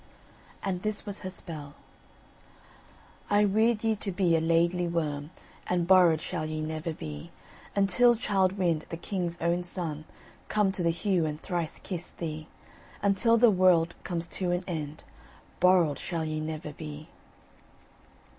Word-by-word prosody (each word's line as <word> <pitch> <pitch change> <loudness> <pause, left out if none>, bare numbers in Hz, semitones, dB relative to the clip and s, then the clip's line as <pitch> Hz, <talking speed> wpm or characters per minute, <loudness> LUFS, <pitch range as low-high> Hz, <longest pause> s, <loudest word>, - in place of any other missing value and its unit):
And 185 -2 -2
this 215 0 -2
was 205 -1 -5
her 185 - -5
spell: 150 -6 -7 1.5
I 205 0 +4
weird 220 +2 +2
ye 225 -1 +2
to 200 0 -4
be 180 -2 +2
a 160 - +2
Laidly 170 +2 +2
Worm, 150 -3 -2 0.4
And 175 -1 +1
borrowed 175 -4 +6
shall 160 -3 -3
ye 155 0 -3
never 155 +2 -3
be, 75 - -7 0.5
Until 200 +5 +4
Childe 195 -5 +1
Wynd, 170 -5 0
the 165 - -4
King's 175 -1 -3
own 170 +1 +1
son 165 -4 -5 0.4
Come 210 -2 +2
to 190 - -4
the 170 - +2
Heugh 170 -1 +1
and 150 0 -4
thrice 170 -3 -3
kiss 180 -3 -6
thee; 155 -2 -5 0.6
Until 205 +4 +4
the 235 -1 +6
world 180 -3 +4
comes 170 -2 -3
to 185 -2 -2
an 175 +1 0
end, 155 -3 -5 0.6
Borrowed 175 -6 +4
shall 165 -3 -3
ye 155 0 -2
never 155 -1 -5
be. 150 0 -8
175 Hz, 150 wpm, -29 LUFS, 155-190 Hz, 1.5 s, borrowed